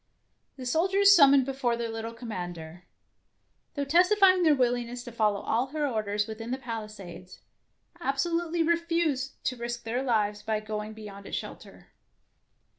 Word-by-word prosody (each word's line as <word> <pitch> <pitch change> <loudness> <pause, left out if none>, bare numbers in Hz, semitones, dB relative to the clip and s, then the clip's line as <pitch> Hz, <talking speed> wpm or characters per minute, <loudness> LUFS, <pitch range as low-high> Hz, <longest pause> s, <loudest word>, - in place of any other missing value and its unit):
The 255 - -7
soldiers 385 +9 +4
summoned 280 -4 +6
before 260 -3 -1
their 235 0 -2
little 225 0 -5
commander, 175 -7 -7 0.9
though 285 -1 -2
testifying 370 +4 +5
their 315 -4 +5
willingness 245 -1 -1
to 240 - -9
follow 210 -3 +1
all 240 +4 0
her 300 +2 -2
orders 210 -4 -1
within 225 +1 -7
the 255 - -1
palisades, 215 -7 -8 0.6
absolutely 335 +3 0
refused 335 -5 0
to 255 - -2
risk 235 0 -5
their 235 +3 -2
lives 210 -5 0
by 220 -1 -1
going 215 0 -5
be 220 0 -11
yond 200 -1 -10
its - - -3
shelter. - - -10
240 Hz, 145 wpm, -28 LUFS, 215-295 Hz, 0.9 s, summoned